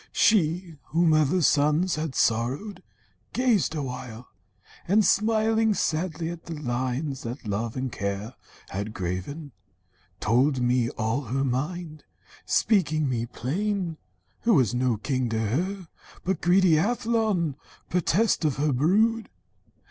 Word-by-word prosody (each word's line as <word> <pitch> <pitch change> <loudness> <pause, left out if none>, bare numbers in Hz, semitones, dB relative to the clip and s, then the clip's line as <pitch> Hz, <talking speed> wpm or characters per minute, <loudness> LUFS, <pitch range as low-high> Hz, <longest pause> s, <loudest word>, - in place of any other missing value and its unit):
She, 175 -4 +2
Whom 165 0 +2
other 155 +3 +3
sons 150 +6 +3
had 155 -4 -3
sorrowed, 125 - 0 0.5
gazed 235 -10 +2
awhile, 125 -4 -6 0.6
And 205 +3 +4
smiling 220 0 +2
sadly 165 0 -1
at 170 -1 -9
the 165 - -6
lines 130 +1 -2
that 120 +2 -6
Love 110 +3 -2
And 130 -1 -2
Care 100 +4 -4 0.4
had 100 +3 -5
graven, 95 - -4 0.7
told 130 +5 +2
me 125 -1 +2
all 115 +5 -1
her 135 +4 -1
mind, 155 +5 -3 0.4
Speaking 155 -8 +2
me 120 -2 -1
plain, 175 - -2 0.4
who 230 -3 +3
was 125 -6 +3
no 125 -2 +1
king 125 +3 -1
to 110 0 -1
her, 175 - -2 0.4
But 185 -2 -1
greedy 175 -3 +4
Athlon, 220 - 0 0.4
pertest 180 +4 +2
of 150 -4 +1
her 145 +1 +1
brood. 215 - +2
150 Hz, 125 wpm, -26 LUFS, 125-185 Hz, 0.7 s, And